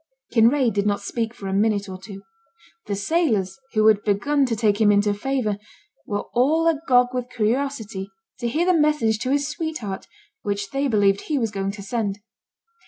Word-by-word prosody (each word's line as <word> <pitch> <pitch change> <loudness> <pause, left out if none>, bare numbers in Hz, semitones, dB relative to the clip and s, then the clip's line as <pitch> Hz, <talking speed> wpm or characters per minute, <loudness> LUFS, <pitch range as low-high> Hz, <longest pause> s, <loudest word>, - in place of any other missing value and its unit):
Kinraid 240 +1 +4
did 200 +1 0
not 205 -1 +1
speak 225 +2 -2
for 200 -4 -8
a 190 - -2
minute 205 0 +1
or 185 -1 -7
two. 195 0 -10 0.6
The 200 - -1
sailors, 210 - 0
who 215 -1 +3
had 215 -2 +5
begun 270 +8 +1
to 230 - -1
take 215 -1 +1
him 210 -1 +6
into 205 0 +3
favour, 215 -2 -1 0.5
were 205 0 -2
all 300 +7 +3
agog 265 -6 +3
with 250 -1 -3
curiosity 225 -4 -2 0.3
to 240 - -1
hear 310 +9 0
the 365 - +4
message 300 -9 +2
to 255 - -2
his 285 0 +1
sweetheart, 300 - -4 0.3
which 200 -1 -3
they 275 +1 0
believed 200 -4 +3
he 305 - 0
was 225 -5 0
going 195 -1 -2
to 200 -1 -8
send. 205 -1 -2
220 Hz, 180 wpm, -23 LUFS, 205-270 Hz, 0.6 s, him